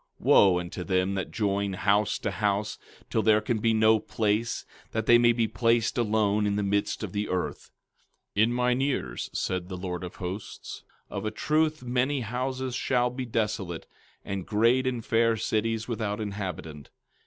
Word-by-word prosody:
15:8 - - -15
Wo 95 -3 +6
unto 90 +1 -5
them 95 +1 +1
that 95 -2 -3
join 100 -2 -1
house 105 +2 +2
to 105 - -3
house, 100 +2 -1 0.3
till 110 - +2
there 110 -1 +5
can 110 +1 -1
be 115 +1 +2
no 110 0 +4
place, 110 +2 -1 0.3
that 110 -1 -1
they 120 +1 +7
may 120 0 +5
be 115 -1 +1
placed 115 0 +1
alone 105 -2 +2
in 100 - 0
the 105 - 0
midst 100 +2 0
of 105 - -4
the 105 +1 -2
earth! 90 -1 -3 0.7
15:9 105 - +5
In 115 - -1
mine 125 +1 +1
ears, 130 - -2
said 90 -1 -2
the 90 - -5
Lord 90 -1 -4
of 90 - -7
Hosts, 95 +3 -7 0.3
of 100 - -4
a 110 - 0
truth 155 +5 0
many 125 +3 0
houses 130 +2 -3
shall 125 -1 +1
be 125 0 -5
desolate, 105 -7 -2 0.4
and 95 -2 -4
great 115 +5 +3
and 125 -3 -2
fair 115 0 +3
cities 110 +1 -1
without 110 -3 -2
inhabitant. 90 -8 -5
110 Hz, 175 wpm, -27 LUFS, 100-120 Hz, 0.7 s, they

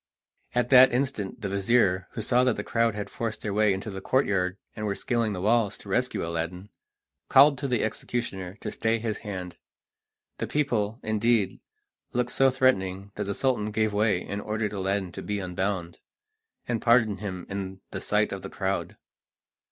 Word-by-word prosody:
At 125 +1 +1
that 130 0 +9
instant 120 -5 -2
the 100 - -2
vizir, 100 -2 +2
who 110 - -3
saw 125 +3 +3
that 125 - +2
the - - -4
crowd 115 -2 +1
had 105 -1 -4
forced 115 +1 -4
their 105 - -2
way 105 0 +3
into 95 +3 -3
the 95 0 -6
courtyard 95 -7 +1 0.2
and 105 0 -3
were 100 - -1
scaling 115 -2 0
the 90 - -4
walls 110 0 +2
to 100 - -12
rescue 125 -1 0
Aladdin, 85 +4 -4 0.6
called 140 +2 +7
to 140 - -2
the 125 -4 +1
executioner 100 -5 -3
to - - -4
stay 115 +1 0
his 110 -1 -3
hand. 95 -4 -6 0.8
The - - -2
people, 120 -7 0
indeed, 110 -1 +1 0.5
looked 125 0 0
so 135 +1 +4
threatening 100 -7 +1
that 105 - -3
the 100 0 -2
Sultan 120 -6 0
gave 110 0 0
way 105 -3 +2
and 100 +1 -4
ordered 105 -1 -2
Aladdin 95 -1 -1
to - - -7
be 105 - -3
unbound, 95 -2 -3 0.7
and 120 -2 -1
pardoned 115 -4 +4
him 95 -3 -5
in 95 -1 -5
the - - -5
sight - - +1
of - - -4
the - - -7
crowd. - - -2
105 Hz, 180 wpm, -27 LUFS, 95-120 Hz, 0.8 s, that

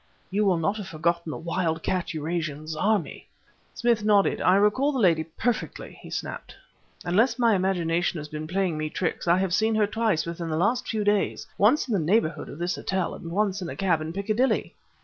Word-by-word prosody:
You 205 +2 +1
will 185 -3 +3
not 195 +6 0
have 205 -3 -6
forgotten 170 +1 -1
the - - -4
wild 165 -1 -2
cat 185 -2 -1
Eurasian 155 -1 -3
Zarmi?" 170 +5 -1 0.5
Smith 235 -3 +1
nodded. 205 -2 +3
"I 180 - +5
recall 210 +8 +3
the 275 - -3
lady 170 -8 +3
perfectly!" 220 +9 -3
he - - -11
snapped. - - -6 0.5
"Unless 225 +8 +2
my 235 -3 +4
imagination 175 -2 0
has 150 -1 -6
been 155 +1 -6
playing 180 -3 -1
me 155 0 -2
tricks, 175 +2 -3
I 170 +1 +5
have 190 -2 0
seen 220 +2 +2
her 215 -1 +3
twice 215 -4 0
within 170 0 -5
the 155 - -1
last 210 +9 +1
few 215 -2 -1
days 205 -1 +1
once 240 +8 +3
in 235 - -2
the 200 - +2
neighborhood 165 -2 +1
of - - -9
this 175 +1 -2
hotel 190 -2 -2
and 165 - -8
once 200 +2 0
in 175 - -4
a - - -6
cab 175 -5 +1
in 155 +1 -4
Piccadilly." 215 +7 0
185 Hz, 205 wpm, -26 LUFS, 165-210 Hz, 0.5 s, I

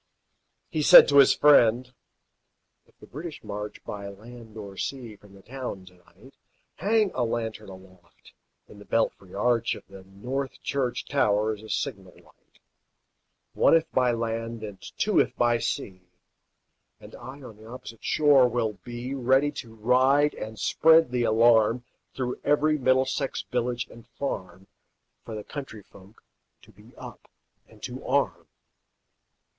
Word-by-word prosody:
He 155 - -1
said - - +9
to 140 - +4
his 140 - +6
friend, 125 -3 +4 0.9
"If - - -30
the - - -15
British 155 +2 -9
march 105 0 -7
By 100 -1 -7
land 110 +2 -12
or 100 -2 -9
sea 120 -1 -5
from 100 -1 -19
the 95 - -17
town 125 -6 -7
to 90 - -16
night, 90 -1 -20 0.4
Hang 210 +2 +1
a 125 - -1
lantern 115 -2 -4
aloft 95 -2 -17 0.3
in 105 - -15
the 105 - -13
belfry 100 -4 -2
arch 115 +2 +1
Of - - -13
the 95 -1 -13
North 125 +9 -5
Church 130 -3 -2
tower 110 -5 +1
as 105 - -10
a 110 - -12
signal 100 -10 -4
light, - - -25 1.0
One, - - +4
if 165 0 0
by 125 -1 +2
land, 115 -1 -4
and 105 -3 -8 0.2
two, - - +2
if - - +1
by 120 -1 +2
sea; 95 -4 -4 1.0
And - - -14
I 135 +2 -11
on 110 -4 -11
the 110 +1 -15
opposite 115 -2 -11
shore 145 -4 +4
will 115 -3 -2
be, 120 +2 -6
Ready 135 +2 +2
to 115 -6 -9
ride 130 +6 +3
and 110 0 -8
spread 160 +6 +4
the 125 -1 0
alarm 115 +1 +3 0.3
Through 125 -1 -3
every 150 +1 +2
Middlesex 130 +1 0
village 125 0 -1
and 115 0 -16
farm, 95 -8 -6 0.6
For 115 - -7
the 105 - -6
country 135 -7 -8
folk 95 +3 -19 0.4
to - - -18
be - - -20
up - - -12 0.4
and - - -20
to - - -7
arm." - - -1
120 Hz, 150 wpm, -26 LUFS, 105-130 Hz, 1.0 s, said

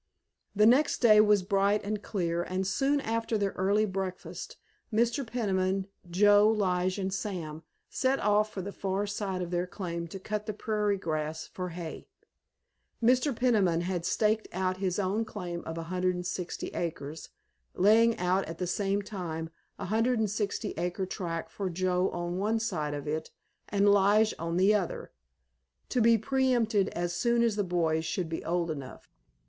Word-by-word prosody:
The 210 +1 +5
next 260 +7 +4
day 215 -3 +7
was 210 -2 +4
bright 200 +1 +2
and 210 0 -3
clear, 170 -5 -1
and 185 +2 -2
soon 275 +9 +1
after 225 -1 -1
their 200 -1 0
early 200 +3 +2
breakfast 190 -2 -5 0.3
Mr. 235 +5 +1
Peniman, 195 -5 0 0.2
Joe, 205 +3 +5
Lige, 185 -3 +1
and 190 -1 -2
Sam 175 -7 -4 0.3
set 265 +1 0
off 210 +1 +2
for 190 - -5
the 200 - -5
far 195 +1 -2
side 200 -3 -3
of 175 - -6
their 175 0 0
claim 170 -3 -5
to 180 - -7
cut 210 +2 -4
the 215 - -3
prairie 210 -2 0
grass 155 -2 -3
for 180 -1 -5
hay. 170 -2 -7 0.9
Mr. 250 +4 +3
Peniman 205 -9 +2
had 175 -1 -2
staked 215 +4 +1
out 185 0 -1
his 185 -2 -1
own 205 +3 0
claim 180 -6 -5
of 160 0 -5
160 180 +1 -2
acres, 155 -2 -5 0.5
laying 225 +4 +5
out 180 +2 +1
at 165 +1 -7
the 180 - -2
same 200 +2 0
time 165 -5 -5 0.3
a - - -6
160 220 -1 0
acre 180 +3 -2
tract 170 -3 -4
for 195 -2 -3
Joe 180 +1 +1
on 175 +1 -3
one 215 +3 +1
side 160 -10 -2
of 145 0 -6
it 155 +1 -2 0.4
and 205 0 +2
Lige 205 +2 +4
on 165 +1 -2
the 195 +3 +5
other, 475 - -2 0.8
to 250 - +1
be 230 0 +6
pre 265 +4 0
empted 225 -4 +2
as 175 0 -3
soon 235 +2 +2
as 230 -3 +2
the 205 - +1
boys 165 -3 0
should 170 +1 -2
be 160 - -4
old 170 -1 -1
enough. 140 -4 -8
195 Hz, 165 wpm, -29 LUFS, 175-215 Hz, 0.9 s, day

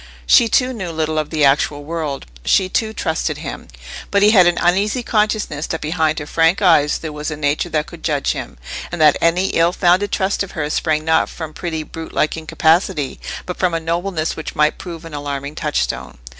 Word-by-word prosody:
She, 235 - +6
too, 255 +3 +2
knew 190 -7 -5
little 155 -1 -1
of 150 - -3
the 155 -3 +2
actual 145 +1 +2
world; 155 -3 -4 0.2
she, 185 - +2
too, 220 +3 0
trusted - - -2
him; - - -7 0.4
but 200 0 +2
he 210 - +6
had 185 -5 +6
an 175 - +2
uneasy 200 +8 +1
consciousness 210 -9 0
that 160 - -3
behind 155 0 0
her 145 - -4
frank 165 +3 +2
eyes 165 -7 +4
there 160 -2 -6
was 150 +1 -4
a 155 - -5
nature 145 +3 0
that 155 -2 0
could 170 - -12
judge 145 -3 0
him, 65 - -6 0.3
and 175 - -4
that 155 -2 +6
any 175 +3 +2
ill 165 +1 +3
founded 185 +2 +2
trust 190 +1 0
of 200 - -4
hers 150 -1 -2
sprang 155 -1 0
not 160 0 +2
from 160 -2 -7
pretty 160 -3 -4
brute 165 +1 -9
like 155 - +1
incapacity, 160 -1 +1 0.3
but 180 - -5
from 180 -2 +1
a - - 0
nobleness 165 0 -2
which 160 - -7
might 150 0 +2
prove 170 -3 -8
an 165 - -10
alarming 145 0 -4
touchstone. 150 - -2
165 Hz, 205 wpm, -19 LUFS, 150-180 Hz, 0.4 s, She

